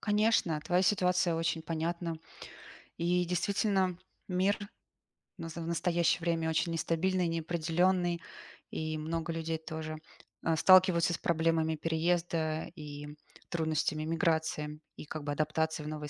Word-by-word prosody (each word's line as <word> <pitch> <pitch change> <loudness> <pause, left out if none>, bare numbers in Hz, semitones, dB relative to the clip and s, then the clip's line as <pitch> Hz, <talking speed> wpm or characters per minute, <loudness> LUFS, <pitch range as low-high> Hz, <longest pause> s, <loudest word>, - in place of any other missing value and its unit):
Конечно, 210 -7 +2
твоя 180 +3 +2
ситуация 180 -3 +2
очень 165 0 -1
понятна. 165 +1 -2 0.8
И 175 +1 +2
действительно, 185 +1 +1 0.3
мир 190 +2 +2 0.8
в - - -9
наза 165 0 -6
в 165 - -5
настоящее 170 0 +1
время 165 -1 0
очень 165 +1 +1
нестабильный, 175 +2 +1
неопределённый, 170 +2 +1 0.5
и 155 0 -3
много 165 +1 -3
людей 165 0 -2
тоже, 160 -1 -5 0.5
э, 165 0 +3
сталкиваются 180 0 +6
с - - -1
проблемами 160 -1 +1
переезда 165 0 0
и 145 -2 -8 0.4
трудностями 155 -2 0
эмиграции 160 -2 0 0.2
и - - -8
как 155 0 -6
бы 145 - -2
адаптации 155 +1 0
в - - -6
новой 150 -1 -5
165 Hz, 125 wpm, -31 LUFS, 160-175 Hz, 0.8 s, сталкиваются